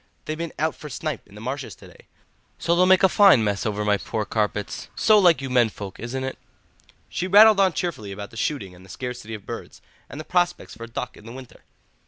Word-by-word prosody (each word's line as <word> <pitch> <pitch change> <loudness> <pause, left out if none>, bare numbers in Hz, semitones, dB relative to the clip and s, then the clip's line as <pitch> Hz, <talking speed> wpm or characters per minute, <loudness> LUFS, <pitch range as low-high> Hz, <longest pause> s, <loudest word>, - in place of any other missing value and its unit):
They've 155 - -3
been 165 0 -5
out 160 0 0
for 150 - -10
snipe 150 -2 -5
in 100 - -17
the 105 - -10
marshes 130 +3 -5
to - - -15
day, - - -19 0.5
so 170 - +1
they'll 180 +1 +4
make 190 +1 +5
a - - +8
fine 190 - +6
mess 100 0 -1
over 105 0 -2
my 105 -1 +3
poor 110 +2 -4
carpets. 105 -1 -2
So 215 -1 +5
like 175 -7 +4
you 135 - -4
men 120 -3 +4
folk, 100 -2 -9
isn't 130 +3 -4
it?" 130 - -5 0.7
She 185 - -3
rattled 210 +2 +7
on 190 -3 +4
cheerfully 130 - -4
about 100 +4 -8
the - - -14
shooting 120 - -3
and 90 +1 -16
the 95 - -17
scarcity 125 -1 -6
of 105 - -11
birds, - - -8 0.3
and 140 - -8
the - - -5
prospects 175 -1 0
for 115 - -9
duck 115 - -6
in 105 - -14
the - - -8
winter. 130 0 -12
130 Hz, 235 wpm, -23 LUFS, 105-170 Hz, 0.7 s, a